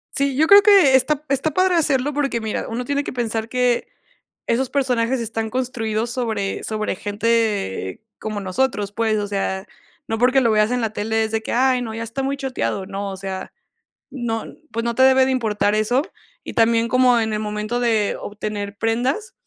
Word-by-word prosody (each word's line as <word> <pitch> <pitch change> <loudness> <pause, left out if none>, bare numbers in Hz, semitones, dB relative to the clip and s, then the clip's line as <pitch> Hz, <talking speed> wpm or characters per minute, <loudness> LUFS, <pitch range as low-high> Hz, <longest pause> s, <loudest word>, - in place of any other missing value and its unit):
Sí, 275 -1 0
yo 305 +4 +4
creo 400 +4 +8
que 390 -11 +6
está 290 +3 +2
está 275 +3 +1
padre 370 +4 +2
hacerlo, 290 -3 +1
porque 275 -4 0
mira, 220 -1 -3
uno 240 +2 -3
tiene 285 +2 -1
que - - -5
pensar 230 -2 -2
que 250 -1 +1 0.6
esos 245 +2 0
personajes 255 -2 +1
están 225 -1 -3
construidos 235 -3 -2
sobre 225 -5 -2
sobre 215 -2 -2
gente 205 - -1 0.2
como 215 -1 -4
nosotros, 205 +1 -1
pues. 220 0 0
O 205 - -2
sea, 195 -1 -2 0.4
no 225 - -1
porque 250 +3 +4
lo 235 - +3
veas 215 +1 +3
en 250 0 0
la 225 - 0
tele, 220 +1 0
es 220 - -5
de 220 0 -1
que: - - -5
"Ay 255 0 +2
no, 225 -2 -5
ya 225 - -5
está 230 +4 -4
muy 275 +1 -1
choteado". 220 - -3
No, 200 0 -4
o 190 - -7
sea, 190 0 -6 0.6
no 230 -4 -3 0.3
pues 230 0 -2
no 235 0 -1
te 260 - +4
debe 265 0 +6
de 265 - 0
importar 210 -5 +1
eso. 215 +5 +2 0.4
Y - - -7
también 230 0 +3
como 250 -1 +4
en 220 -1 -1
el 210 - -1
momento 210 +2 -3
de 225 -4 +1
obtener 205 -1 -5
prendas 250 - -1
230 Hz, 195 wpm, -21 LUFS, 215-260 Hz, 0.6 s, creo